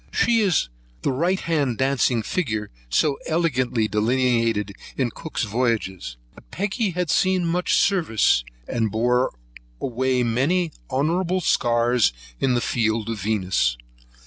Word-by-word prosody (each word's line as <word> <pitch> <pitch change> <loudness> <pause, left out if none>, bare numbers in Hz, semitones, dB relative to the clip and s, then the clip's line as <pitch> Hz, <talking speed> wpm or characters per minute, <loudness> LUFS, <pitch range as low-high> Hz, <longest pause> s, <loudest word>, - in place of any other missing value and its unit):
She 235 -1 +3
is 190 - +2 0.4
the - - +1
right 175 +8 +1
hand 145 -8 0
dancing 130 -3 +1
figure 110 - -2 0.2
so 140 - +1
elegantly 130 -9 +1
delineated 115 -2 +1 0.2
in 125 -4 0
Cook's 160 +2 -4
Voyages. 105 - -2 0.2
But - - -18
Peggy 205 +3 -1
had 180 -3 -2
seen 185 -2 +2
much 175 +2 +1
service, 135 - +2 0.2
and 115 -2 0
bore 125 +3 +1 0.5
away 130 0 0
many 150 +9 +1 0.2
honourable 170 +7 0
scars 120 - +2 0.3
in 130 -2 +2
the 120 - +1
fields 115 -1 0
of 110 -3 -5
Venus. 95 - 0
125 Hz, 125 wpm, -23 LUFS, 110-165 Hz, 0.5 s, She